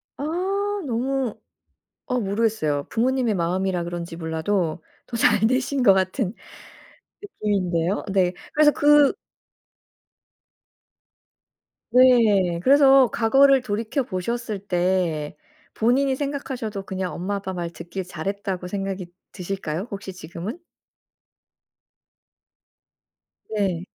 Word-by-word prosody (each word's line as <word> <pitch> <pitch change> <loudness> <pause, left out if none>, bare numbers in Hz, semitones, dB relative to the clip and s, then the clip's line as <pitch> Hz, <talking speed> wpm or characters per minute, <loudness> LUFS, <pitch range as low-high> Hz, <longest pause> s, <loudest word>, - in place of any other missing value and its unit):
아 280 - -6 0.6
너무 255 0 -1 0.7
어 250 -1 0
모르겠어요. 200 -9 0
부모님의 245 0 +1
마음이라 180 +1 -1
그런지 170 -1 -5
몰라도 160 +1 -2 0.2
더 235 - -4
잘 220 -1 +4
되신 260 +2 0
것 195 - +7
같은 190 +2 0 1.1
느낌인데요. 185 -3 0
네. 185 -2 +2 0.2
그래서 300 0 +5
그 295 -1 +5 2.8
네. 220 -9 +5
그래서 270 -1 +6
과거를 270 +4 +4
돌이켜 230 +4 -2
보셨을 220 +1 -3
때 180 -5 -1 0.4
본인이 265 +4 +2
생각하셔도 265 -7 -4
그냥 190 -1 -4
엄마 195 +3 -3
아빠 190 -1 -4
말 175 -2 -4
듣길 170 +3 -7
잘했다고 185 +1 -4
생각이 195 -1 -4 0.2
드실까요? 185 0 -4
혹시 195 -1 -6
지금은? 185 - -7 2.9
네. 190 -5 -1
200 Hz, 220 characters per minute, -23 LUFS, 180-245 Hz, 2.9 s, 것